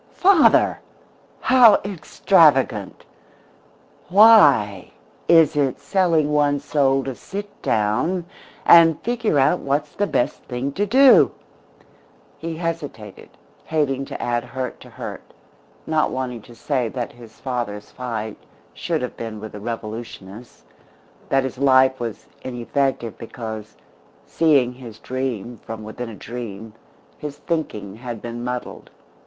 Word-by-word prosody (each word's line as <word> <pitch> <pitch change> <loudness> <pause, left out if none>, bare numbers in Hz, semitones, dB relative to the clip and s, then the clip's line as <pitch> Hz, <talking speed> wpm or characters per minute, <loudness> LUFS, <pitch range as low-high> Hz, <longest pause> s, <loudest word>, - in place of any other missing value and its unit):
"Father! 365 -4 +4 0.6
How 245 -5 +7
extravagant! 150 - +2 1.0
Why 145 - +5 0.4
is 165 -4 +5
it 140 -3 0
selling 165 -6 +1
one's 145 -1 +1
soul 135 -2 +2
to 135 - -4
sit 200 +10 -8
down 115 - 0 0.4
and 165 -2 +7
figure 230 -8 0
out 140 +6 +3
what's 145 +2 -2
the 205 - -1
best 120 - -1
thing 125 +3 -3
to 205 +8 -2
do?" 265 +5 +6 1.1
He 165 -1 -5
hesitated, 150 - -6 0.4
hating 135 -4 -1
to - - -7
add 120 -1 -1
hurt 125 0 -6
to - - -14
hurt, - - -8 0.6
not 155 -1 +1
wanting 125 -3 -4
to 120 - -13
say 125 -3 -1
that 120 0 -5
his 115 -2 -16
father's 120 -6 -4
fight 110 -4 -5 0.4
should 160 -5 -2
have 125 - -5
been 110 -2 -6
with 110 0 -8
the 105 - -9
revolutionists, 110 - -8 0.7
that 135 -1 +2
his 130 -1 -5
life 130 -1 +4
was 115 -3 -5 0.2
ineffective 120 -1 -2
because, 110 -2 -8 0.5
seeing 140 -7 +2
his 120 -4 -11
dream 125 -2 -4
from 110 0 -8
within 110 +3 -7
a 110 - -9
dream, 110 -1 -8 0.5
his 150 -1 -7
thinking 105 - -4
had 120 -1 -7
been 120 +1 -7
muddled. 125 0 -6
130 Hz, 125 wpm, -21 LUFS, 115-155 Hz, 1.1 s, How